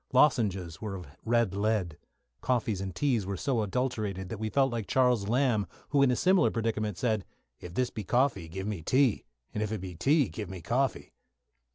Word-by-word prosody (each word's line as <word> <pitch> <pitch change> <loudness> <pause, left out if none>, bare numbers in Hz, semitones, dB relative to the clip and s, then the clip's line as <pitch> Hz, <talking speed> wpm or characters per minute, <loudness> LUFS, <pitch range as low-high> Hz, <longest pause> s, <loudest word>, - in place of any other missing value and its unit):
Lozenges 100 - +2
were 105 -3 -4
of 90 - -7 0.2
red 115 -4 +2
lead. 100 -5 0 0.5
Coffees 115 -6 0
and 95 -2 -5
teas 125 -3 +1
were 95 0 -4
so 125 0 0
adulterated 105 -4 -2
that 110 - -5
we 110 0 -2
felt 135 +2 +2
like 115 -4 -3
Charles 125 -6 +2
Lamb, 120 -3 +2 0.2
who, 145 -2 +3
in 140 - +5
a 125 - +2
similar 180 -5 +4
predicament, 110 -3 -2
said, 110 -5 0 0.4
"If 90 0 -9
this 125 -1 0
be 110 - -5
coffee, 120 -5 +1
give 95 +3 -5
me 105 -5 -3
tea; 130 - +2 0.3
and 105 - -2
if 105 0 -1
it 110 - -2
be 90 -1 -6
tea, 140 - +3
give 105 -5 -6
me 95 -1 -6
coffee." 125 +11 -1
110 Hz, 195 wpm, -29 LUFS, 95-125 Hz, 0.5 s, in